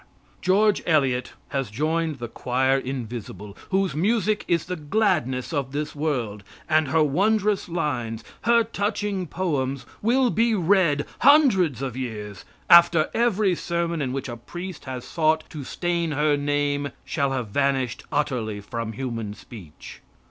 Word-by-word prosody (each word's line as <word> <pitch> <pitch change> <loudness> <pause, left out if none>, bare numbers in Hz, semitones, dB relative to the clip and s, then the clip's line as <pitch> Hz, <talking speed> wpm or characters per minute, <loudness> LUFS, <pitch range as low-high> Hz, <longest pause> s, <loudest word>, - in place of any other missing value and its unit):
"George 205 +3 +3
Eliot" 135 -6 +1 0.2
has 135 -5 -2
joined 155 +6 -1
the 120 -1 -5
choir 130 +3 +1
invisible 120 -6 -6
whose 190 -4 +1
music 210 +4 +1
is 170 -2 +1
the 180 +2 -3
gladness 155 - 0
of 140 -3 -2
this 150 +1 -3
world, 125 -9 -2 0.2
and 155 -2 +3
her 155 +4 +3
wondrous 200 +6 +1
lines, 120 -9 -2 0.2
her 235 0 +5
touching 205 -3 -2
poems, 140 -7 -2 0.2
will 245 +2 +3
be 230 0 +2
read 170 -6 +2
hundreds 195 - +5
of 130 -4 -4
years 105 -6 -6 0.2
after 170 -2 +6
every 215 -5 +2
sermon 170 -1 -2
in 130 -3 -1
which 135 0 -3
a 120 - -5
priest 175 +8 -8
has 130 -2 -6
sought 155 +1 +1
to 150 -3 -6
stain 170 +2 -1
her 150 +1 +2
name 145 0 0 0.2
shall 140 -4 0
have 125 -5 -3
vanished 135 0 0
utterly 120 -8 -1
from 110 +2 -5
human 115 -4 -4
speech. 100 -7 -12
150 Hz, 140 wpm, -24 LUFS, 130-180 Hz, 0.2 s, after